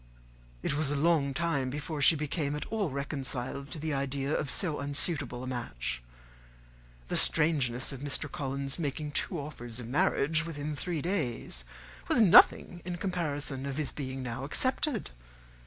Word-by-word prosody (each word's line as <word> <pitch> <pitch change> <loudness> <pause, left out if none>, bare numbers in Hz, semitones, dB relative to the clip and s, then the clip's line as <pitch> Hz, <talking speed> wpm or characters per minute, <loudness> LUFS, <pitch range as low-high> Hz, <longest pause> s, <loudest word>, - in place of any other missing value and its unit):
It - - 0
was 145 0 +1
a 145 - 0
long 150 -2 +2
time 140 -3 0
before 145 +2 -4
she 160 - +8
became 150 -1 -2
at 150 - -4
all 210 -6 0
reconciled 140 -1 -3
to - - -6
the 155 0 -2
idea 140 +1 -1
of 140 - -1
so 160 -6 +1
unsuitable 140 -3 0
a - - -4
match. 65 - -3 1.1
The - - -2
strangeness 135 -6 +3
of 135 - -7
Mr. 145 +1 -1
Collins's 140 +1 -3
making 150 -1 -3
two 175 - 0
offers 120 -5 -6
of 120 - -6
marriage 145 +4 +2
within 150 -2 -4
three 165 -1 -3
days 125 - -2 0.4
was - - +2
nothing 180 -3 +6
in 180 0 -4
comparison 150 -7 -3
of 135 0 -4
his 150 -3 -1
being 130 -2 -5
now 125 +1 -4
accepted. 255 - +1
145 Hz, 155 wpm, -30 LUFS, 135-160 Hz, 1.1 s, she